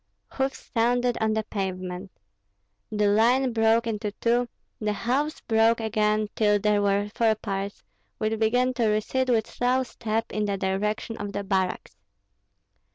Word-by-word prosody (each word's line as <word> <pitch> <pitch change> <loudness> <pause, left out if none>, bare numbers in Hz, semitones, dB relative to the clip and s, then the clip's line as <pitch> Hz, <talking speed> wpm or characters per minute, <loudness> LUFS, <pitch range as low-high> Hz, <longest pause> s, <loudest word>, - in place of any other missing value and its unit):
Hoofs 270 0 -3
sounded 245 +1 +2
on 220 0 +2
the 220 - 0
pavement. 185 -2 -4 0.8
The 210 -1 +1
line 235 +5 +3
broke 225 +1 +3
into 215 -2 -2
two; 240 +2 +1 0.3
the 210 -1 -1
halves 270 +9 -1
broke 225 0 +3
again 215 -1 +1
till 210 -1 +3
there 210 0 +2
were 200 +1 +1
four 225 -2 +3
parts, 200 -1 -5 0.3
which 220 0 -1
began 245 +3 +2
to 235 -3 +1
recede 220 +5 0
with 225 -3 +3
slow 250 +2 0
step 225 -2 -3
in 210 0 -1
the 200 -1 -1
direction 210 +4 -2
of 205 -1 -5
the 200 - -3
barracks. 190 - -2
220 Hz, 150 wpm, -26 LUFS, 205-235 Hz, 0.8 s, line